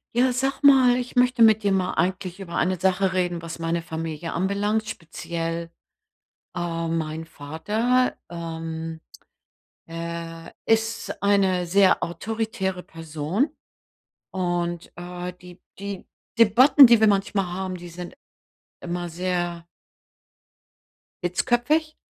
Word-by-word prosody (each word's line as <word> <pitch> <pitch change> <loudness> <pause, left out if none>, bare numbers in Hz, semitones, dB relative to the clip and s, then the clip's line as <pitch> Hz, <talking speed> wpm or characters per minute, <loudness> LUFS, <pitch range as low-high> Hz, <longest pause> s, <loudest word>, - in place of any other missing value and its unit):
Ja, 250 +1 +3
sag 270 +2 -1
mal, 260 -3 +6
ich 250 +1 -5
möchte 250 -1 +3
mit 220 -1 +6
dir 200 - +2
mal 185 -1 +1
eigentlich 185 0 -2
über 170 -3 -7
eine 185 +1 +1
Sache 190 +1 +1
reden, 180 -2 -1
was 165 0 -7
meine 165 +1 -1
Familie 165 0 -5
anbelangt, 200 +4 0
speziell, 165 -1 -5 0.8
ähm, 165 -2 -2
mein 160 0 -4
Vater, 210 - 0
ähm, 165 -1 -5 0.9
er 165 0 -6
ist 225 0 0
eine 195 -3 +2
sehr 190 +2 +4
autoritäre 215 0 -3
Person. 165 - -3 0.7
Und, 175 -2 -2
äh, 180 +1 -6
die 180 0 -13 0.2
die 200 -1 -6 0.3
Debatten, 245 +6 +8
die 235 -2 +6
wir 220 - +5
manchmal 195 -1 +1
haben, 185 0 -4
die 175 0 -10
sind 175 +1 -8 0.7
immer 175 0 -4
sehr 175 -1 -2 1.6
hitzköpfig. 250 - +1
180 Hz, 115 wpm, -24 LUFS, 170-215 Hz, 1.6 s, Debatten